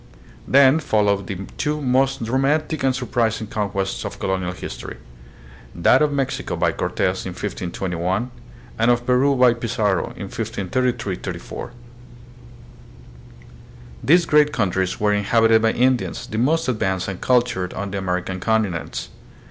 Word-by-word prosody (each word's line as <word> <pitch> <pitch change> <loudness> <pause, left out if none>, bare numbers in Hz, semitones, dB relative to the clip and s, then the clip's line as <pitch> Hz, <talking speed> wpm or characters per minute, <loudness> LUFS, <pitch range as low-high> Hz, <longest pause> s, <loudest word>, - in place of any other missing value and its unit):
Then 140 +2 +6
followed 100 - +1
the 100 +1 -5
two 150 +1 0
most 135 0 +1
romantic 140 +6 0
and 130 -1 +2
surprising 115 -3 -1
conquests 100 -2 -2
of - - -6
colonial 95 -1 -2
history, - - -7 0.8
that 105 - +4
of 150 -1 +3
Mexico 135 -2 -2
by - - +1
Cortes - - -1
in - - -5
1521, 90 +5 -3 0.5
and 115 +1 +3
of 120 0 +2
Peru 130 +3 +3
by 125 -2 +5
Pizarro 110 -5 0
in - - -7
1533 120 -1 -2
34. - - -7 2.3
These 170 +7 +5
great 150 -2 +4
countries 95 -4 -1
were 105 0 +2
in 105 0 0
habited 115 0 +4
by 110 0 +2
Indians, 125 0 +1
the 110 - -4
most 155 +6 +1
advanced 95 -6 -1
and 95 -2 -5
cultured 120 -8 +1
on 100 +1 -4
the 100 - -2
American 95 0 -2
continents. 105 -5 -1
115 Hz, 135 wpm, -21 LUFS, 95-130 Hz, 2.3 s, Then